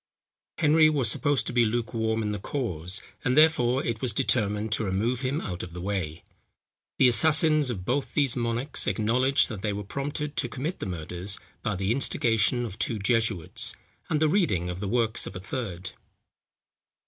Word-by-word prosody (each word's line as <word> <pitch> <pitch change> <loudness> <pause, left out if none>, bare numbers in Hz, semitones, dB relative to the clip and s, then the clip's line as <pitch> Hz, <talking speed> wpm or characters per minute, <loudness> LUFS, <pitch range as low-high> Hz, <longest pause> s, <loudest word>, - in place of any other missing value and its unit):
Henry 155 +1 +5
was 135 -7 +3
supposed 145 -2 +1
to - - -4
be 120 -1 +4
lukewarm 110 -1 -1
in 105 - -1
the 105 - -3
cause, 95 - -3 0.2
and 125 +3 +1
therefore 135 -5 +4
it 115 -2 -2
was 125 -4 0
determined 105 -1 0
to 110 - +1
remove 110 +6 0
him 135 +3 -1
out 90 -3 -5
of 85 - -8
the 90 - -7
way. 90 -4 -3 0.7
The 130 - +6
assassins 155 +4 +4
of 95 -7 -4
both 135 +5 -2
these 140 -5 +2
monarchs 120 +3 -1
acknowledged, 125 +5 +2
that 105 -5 -6
they 105 -1 -1
were 105 +1 -4
prompted 145 +6 -4
to 120 - 0
commit 150 +9 -4
the - - -4
murders, 90 +3 -4 0.2
by 110 -3 -1
the 95 +2 -1
instigation 120 -1 +1
of 105 -2 -8
two 115 - -1
jesuits, 110 -5 0 0.3
and 150 - +1
the 155 - +3
reading 105 - +1
of 90 - -6
the 100 - -3
works 115 +1 0
of - - -8
a - - -4
third. 95 -4 -5
115 Hz, 180 wpm, -27 LUFS, 100-135 Hz, 0.7 s, The